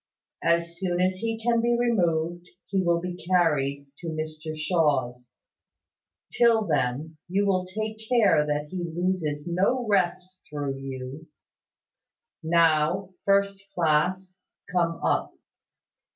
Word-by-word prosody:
As 170 Hz, 0 st, +1 dB
soon 180 Hz, -2 st, -1 dB
as 185 Hz, +1 st, +1 dB
he 225 Hz, +2 st, -3 dB
can 235 Hz, 0 st, +2 dB
be 240 Hz, 0 st, +2 dB
removed, 175 Hz, -7 st, 0 dB, 0.2 s
he 195 Hz, -1 st, 0 dB
will 170 Hz, -1 st, +2 dB
be 180 Hz, 0 st, -6 dB
carried 150 Hz, -6 st, +1 dB
to 175 Hz, -, -7 dB
Mr 155 Hz, 0 st, -5 dB
Shaw's. 145 Hz, -7 st, 0 dB, 1.0 s
Till 230 Hz, -2 st, +4 dB
then, 150 Hz, +1 st, -1 dB
you 200 Hz, +3 st, +1 dB
will 185 Hz, -2 st, +1 dB
take 215 Hz, +3 st, -4 dB
care 215 Hz, -11 st, +4 dB
that 150 Hz, 0 st, -2 dB
he 185 Hz, -2 st, -3 dB
loses 170 Hz, -3 st, -2 dB
no 195 Hz, +9 st, +1 dB
rest 185 Hz, -2 st, +1 dB, 0.2 s
through 145 Hz, -2 st, -3 dB
you, 135 Hz, +3 st, -7 dB, 1.1 s
Now, 165 Hz, +3 st, +2 dB, 0.2 s
first 200 Hz, 0 st, +2 dB
class, 180 Hz, +3 st, +1 dB, 0.3 s
come 170 Hz, -2 st, +1 dB
up." -, -, 0 dB
175 Hz, 120 wpm, -26 LUFS, 155-190 Hz, 1.1 s, Till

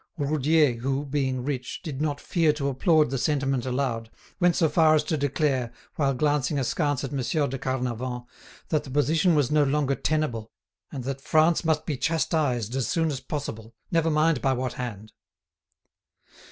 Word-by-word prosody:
Roudier, 150 Hz, -1 st, +2 dB
who, 135 Hz, +3 st, -1 dB
being 135 Hz, -3 st, -1 dB
rich, 130 Hz, -3 st, -4 dB
did 150 Hz, -5 st, -5 dB
not 145 Hz, -2 st, -1 dB
fear 165 Hz, -1 st, +2 dB
to 140 Hz, -2 st, -2 dB
applaud 155 Hz, +1 st, +3 dB
the 135 Hz, -, -1 dB
sentiment 135 Hz, -3 st, 0 dB
aloud, 125 Hz, -3 st, -2 dB, 0.3 s
went 175 Hz, -1 st, +3 dB
so 165 Hz, -, +3 dB
far 155 Hz, +1 st, +4 dB
as 150 Hz, -, +2 dB
to 155 Hz, -, -1 dB
declare, 140 Hz, -4 st, 0 dB, 0.2 s
while 135 Hz, -3 st, +1 dB
glancing 145 Hz, +1 st, +1 dB
askance 145 Hz, +1 st, 0 dB
at 135 Hz, -, -4 dB
Monsieur 145 Hz, +2 st, 0 dB
de 135 Hz, -1 st, -4 dB
Carnavant, 125 Hz, -1 st, -3 dB, 0.4 s
that 155 Hz, -2 st, +1 dB
the -, -, -10 dB
position 160 Hz, +6 st, +2 dB
was 145 Hz, -3 st, +2 dB
no 150 Hz, -1 st, +4 dB
longer 140 Hz, 0 st, +1 dB
tenable, 135 Hz, -8 st, -1 dB, 0.4 s
and 135 Hz, -3 st, -5 dB
that 135 Hz, +1 st, -4 dB
France 160 Hz, +4 st, +3 dB
must 160 Hz, -2 st, +1 dB
be 150 Hz, -5 st, -2 dB
chastised 140 Hz, -, 0 dB
as 135 Hz, -2 st, 0 dB
soon 160 Hz, -2 st, +1 dB
as 135 Hz, -, -3 dB
possible, 115 Hz, -6 st, -6 dB, 0.2 s
never 165 Hz, -1 st, +2 dB
mind 155 Hz, -3 st, +2 dB
by 135 Hz, +1 st, +2 dB
what 130 Hz, -1 st, -2 dB
hand. 110 Hz, -4 st, -6 dB
140 Hz, 170 wpm, -26 LUFS, 130-155 Hz, 0.4 s, far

